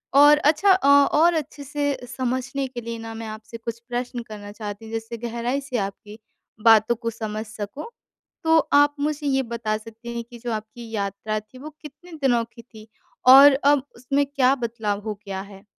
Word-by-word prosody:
और 290 +1 +8
अच्छा 315 +7 +3
अ, 370 -7 +3
और 295 +4 +5
अच्छे 295 -2 -4
से 285 0 -1 0.2
समझने 260 +1 -2
के 245 -2 -7
लिए 230 0 -5
ना 225 0 -7
मैं 225 0 -6
आपसे 220 +1 -8
कुछ 230 0 -6
प्रश्न 245 0 -3
करना 205 -2 -9
चाहती 210 +1 -8
जिससे 225 +1 -5
गहराई 235 +3 -3
से 265 -3 -4
आपकी 205 +2 -5 0.4
बातों 225 +1 +6
को 230 0 -4
समझ 215 0 -5
सकूँ। 215 - -7 0.5
तो 320 0 +4 0.2
आप 290 0 +5
मुझे 295 0 -2
ये 270 -1 +2
बता 230 -2 -2
सकते 225 +2 -11
हैं 235 - -3
कि 240 +1 -13
जो 240 0 -4
आपकी 220 +2 -7
यात्रा 205 +1 -3
थी 215 +4 -17
वो 305 +3 -8
कितने 300 +4 -13
दिनों 240 -3 +3
की 235 - -13
थी? 220 -2 -15 0.4
और 275 +2 +10
अब 280 0 +3
उसमें 275 +4 0
क्या 270 -2 +3
बदलाव 225 -4 -3
हो 215 -1 -3
गया 190 -1 -4
है? 200 +1 -13
235 Hz, 185 wpm, -23 LUFS, 220-280 Hz, 0.5 s, और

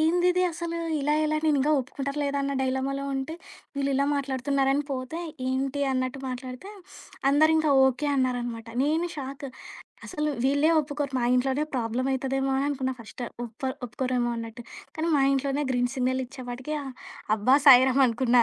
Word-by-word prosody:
ఏందిది 355 +3 +3
అసలు 335 0 -4 0.2
ఇలా 295 +2 +1
ఎలా 310 0 +1
నేను 295 -3 +3 0.2
ఒప్పుకుంటారా 275 +2 -5
లేదా 280 0 -1
అన్న 280 0 -1
డైలమాలో 265 +1 -1
ఉంటే, 270 +4 -3 0.4
వీళ్ళు 280 0 0
ఇలా 280 +1 +2
మాట్లాడుతున్నారని 275 +1 0
పోతే. 260 +5 -4 0.3
ఏంటి 270 +2 -1
అన్నట్టు 255 +1 -2
మాట్లాడితే, 255 +7 -7 0.6
అందరూ 310 +3 +5
ఇంకా 310 -2 +3
ఓకె 265 +3 +1
అన్నారనమాట. 245 -3 -1 0.2
నేను 320 +4 +1
షాకు. 275 0 -6 0.6
అసలు 300 -4 -2
వీళ్ళే 285 +4 +3
ఒప్పుకోరు, 290 -2 -4
మా - - +1
ఇంట్లోనే 265 +3 +1
ప్రాబ్లమయితదేమో 265 +3 -1
అననుకున్నా 270 -2 -1
ఫస్టు. 240 +2 -7 0.2
ఒప్పర్ 260 +4 -5
ఒప్పుకోరేమో 245 0 -1
అన్నట్టు 230 +1 -7 0.3
కానీ 325 +1 0
మా 275 - +3
ఇంట్లోనే 275 +2 0
గ్రీన్ 245 0 0
సిగ్నల్ 260 0 0
ఇచ్చేపటికి 255 +3 -6
ఆహ్, 265 -2 -7 0.4
అబ్బా 255 +6 +4
సాయిరాం 260 +1 +7
అనుకున్నా 240 +1 +3
270 Hz, 145 wpm, -26 LUFS, 255-285 Hz, 0.6 s, సాయిరాం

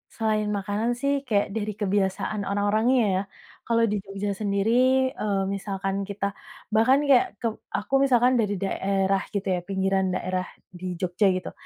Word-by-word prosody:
Selain 215 -1 0
makanan 210 +3 -1
sih 280 +3 0
kayak 205 -3 +2
dari 215 -1 -2
kebiasaan 200 0 -1
orang-orangnya 210 +5 +2 0.2
ya. 190 - +1 0.5
Kalau 230 0 +3
di 210 - 0
Jogja 195 +1 -4
sendiri, 200 +1 0 0.4
eee, 205 -7 -1
misalkan 195 -1 -3
kita 200 0 -2 0.4
bahkan 255 +6 +4
kayak 280 +6 +3
keb 230 -2 0
aku 210 +6 -5
misalkan 250 -1 +4
dari 205 -2 +1
daerah 195 0 0
gitu 200 -1 -1
ya, 180 - -1
pinggiran 190 0 +1
daerah, 185 0 -2 0.2
di 180 0 -6
Jogja 185 +3 +1
gitu. 185 - -4
205 Hz, 150 wpm, -25 LUFS, 195-220 Hz, 0.5 s, bahkan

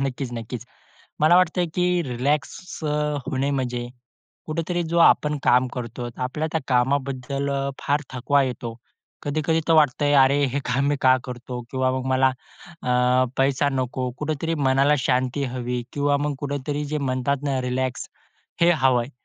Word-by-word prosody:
नक्कीच, 130 -1 -4
नक्कीच. 115 +1 -6 0.6
मला 155 +3 +6
वाटतंय 180 0 +2
की 180 - +2 0.2
रिलॅक्स 145 +7 -2
अ, 150 - 0 0.4
होणे 140 -2 0
म्हणजे 125 -3 -2 0.6
कुठेतरी 165 +2 -2
जो 170 - +2
आपण 150 -2 +4
काम 125 +1 +4
करतो 120 0 -5
आपल्या 130 +5 -2
त्या 160 - 0
कामाबद्दल 135 +1 0 0.3
फार 145 +1 +1
थकवा 140 +3 +2
येतो. 120 -3 -4 0.5
कधी-कधी 155 +2 0
तर - - +5
वाटतंय 145 -1 +3
अरे, 135 +2 +3
हे 140 - 0
काम 135 +2 +1
मी 145 - +1
का 130 0 +5
करतो? 125 -1 -6
किंवा 130 -1 +1
मग 130 0 -3
मला, 130 0 +4 0.5
अ, 125 +1 +3
पैसा 135 +1 +2
नको, 130 -1 -2
कुठेतरी 155 +2 -2
मनाला 135 +3 +4
शांती 130 +1 0
हवी 125 -1 -3
किंवा 145 0 +1
मग 150 -1 -1
कुठेतरी 145 +1 -3
जे 150 +1 -2
म्हणतात 135 0 -1
ना 135 -2 0
रिलॅक्स 125 0 -2 0.5
हे 170 +1 +6
हवं 130 -6 +3
आहे. 120 - -9
135 Hz, 155 wpm, -23 LUFS, 125-145 Hz, 0.6 s, मला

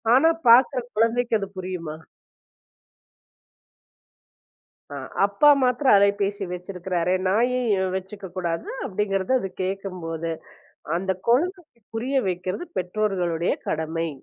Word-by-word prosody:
ஆனா 320 +5 +6 0.2
பாக்குற 250 +2 +6
குழந்தைக்கு 230 +1 +2
அது 195 - -4
புரியுமா? 180 -4 -5 3.0
அ - - -5 0.3
அப்பா 200 +9 +3 0.2
மட்டும் 255 +2 +2
அலைபேசி 200 0 +3
வச்சிருக்காரு. 180 -1 -2
நான் 225 +6 +3
ஏன் 205 -7 +1
வச்சுக்க 190 +1 -6
கூடாது 170 -2 -2 0.2
அப்டிங்கறத 195 +2 -1
அது 195 - -4
கேட்கும்போது, 180 -4 -4 0.7
அந்த 190 +2 -2 0.2
குழந்தைக்குப் 300 - 0
புரிய 250 +5 -2
வைக்கிறது 185 - -3
பெற்றோர்களுடைய 180 -3 0 0.2
கடமை. 160 +1 -1
195 Hz, 95 wpm, -24 LUFS, 180-230 Hz, 3.0 s, ஆனா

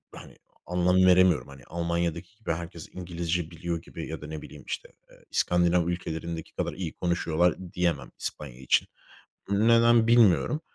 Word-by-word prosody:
hani, - - -12 0.3
anlam 90 +1 +1
veremiyorum. 90 -4 +5
Hani, 70 0 -13
Almanya'daki 85 +3 -2
gibi 110 - -3
herkes 85 0 -7
İngilizce 85 -1 -3
biliyor 85 0 -4
gibi 85 -1 -8
ya 80 0 -6
da 75 - -7
ne 80 -1 -6
bileyim, - - -11
işte, - - -5 0.2
eee, - - -20
İskandinav 85 -1 +2
ülkelerindeki 85 -1 -4
kadar - - -2
iyi 85 -1 -5
konuşuyorlar 85 -1 +1 0.2
diyemem 85 -5 -1
İspanya 65 -5 -6
için. 65 - +2 0.6
Neden 115 +2 +5
bilmiyorum. 115 - +4
85 Hz, 145 wpm, -27 LUFS, 80-90 Hz, 0.6 s, veremiyorum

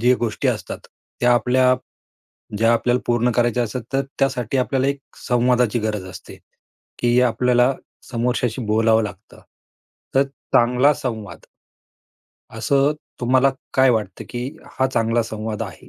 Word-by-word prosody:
जी 125 +2 +4
गोष्टी 115 -3 -1
असतात, - - -3 0.4
त्या 125 0 +4
आपल्या 125 +2 +3 0.8
ज्या 115 +2 +4
आपल्याला 120 +2 +1
पूर्ण 120 0 +2
करायच्या 120 0 +2
असतात, 120 +2 -5
तर 135 0 +2 0.2
त्यासाठी 130 -2 0
आपल्याला 130 +1 +1
एक 140 0 -2 0.3
संवादाची 125 -2 +2
गरज 105 -3 -2
असते, - - -11 0.6
की 120 0 +3
आपल्याला 125 +1 +3 0.4
समोरच्याशी 120 0 -1
बोलावं 110 +1 +3
लागतं. 105 - -10 0.7
तर 135 - +5 0.3
चांगला 125 +4 +4
संवाद 115 -8 -6 1.1
असं 140 +1 +2 0.3
तुम्हाला 130 +2 +3 0.2
काय 130 0 +5
वाटतं, 105 -6 -2
की 125 +1 -4 0.3
हा 130 - +3
चांगला 115 -2 +1
संवाद 110 -1 -5
आहे? - - -9
120 Hz, 130 wpm, -21 LUFS, 115-130 Hz, 1.1 s, तर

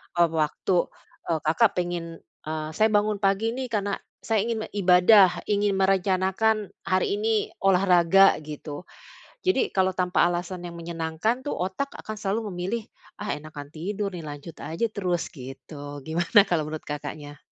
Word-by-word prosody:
eee, 170 -1 +4
waktu, 165 +3 +1 0.4
eee, 165 -2 +1
Kakak 180 +8 +3
pengen, 175 -2 -3 0.2
eee, 155 0 -3
"Saya 215 +7 +3
bangun 210 -1 +1
pagi 200 +3 +1
nih, 255 +2 -4
karena 205 -4 -2 0.2
saya 225 -1 +1
ingin 225 -2 -2
ibadah, 185 0 +5
ingin 205 -1 +1
merencanakan 190 +2 +1 0.2
hari 185 +2 +1
ini 220 -1 0
olahraga," 190 0 +5
gitu. 150 +1 -8 0.6
Jadi 370 -8 +2
kalau 190 -1 +1
tanpa 180 -1 +2
alasan 175 +1 -3
yang 170 - -8
menyenangkan 170 - -2
tuh - - -1
otak 190 +10 -3
akan 215 0 -7
selalu 210 +1 -2
memilih, 190 +6 -3 0.3
"Ah, 210 - -5
enakan 150 -1 -10
tidur 195 +6 -3
nih, 175 -4 -7
lanjut 145 +2 -9
aja 165 +9 -2
terus," 180 -5 -2
gitu. 145 +1 -9
Gimana 170 +7 +4
kalau 175 -6 -1
menurut 155 0 -5
Kakaknya? 145 0 -7
185 Hz, 145 wpm, -25 LUFS, 165-205 Hz, 0.6 s, ibadah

